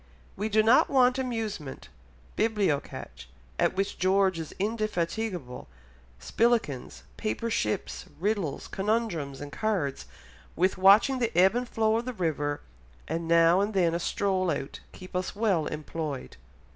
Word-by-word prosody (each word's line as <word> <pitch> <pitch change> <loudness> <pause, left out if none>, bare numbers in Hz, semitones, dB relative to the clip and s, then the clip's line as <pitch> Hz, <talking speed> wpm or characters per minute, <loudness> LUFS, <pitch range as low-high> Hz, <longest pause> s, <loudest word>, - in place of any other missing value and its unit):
We 210 +3 -2
do 215 0 +4
not 225 +3 +5
want 255 -1 +4
amusement; 220 - -4 0.5
bilbocatch, 195 - -1 0.3
at - - +2
which 195 +1 -2
George 190 -1 +2
is 160 - -6
indefatigable, 200 - -2 0.5
spillikens, 215 - 0
paper 115 - -2
ships, 105 - -2
riddles, 195 -6 -1
conundrums, 195 - -2
and 145 0 -7
cards, 190 -11 -2 0.5
with 185 +3 +2
watching 210 +8 +6
the 235 -2 0
ebb 190 +3 +6
and 245 0 -2
flow 220 0 +2
of 235 - -3
the 255 - -4
river, 150 -7 -2 0.5
and 165 +1 -3
now 170 +2 +5
and 205 +1 -2
then 175 -3 +3
a 170 - 0
stroll 185 0 0
out 140 -2 -3
keep 185 0 -12
us 185 +2 -2
well 200 -7 +1
employed." 150 -2 -5
190 Hz, 135 wpm, -28 LUFS, 160-220 Hz, 0.5 s, watching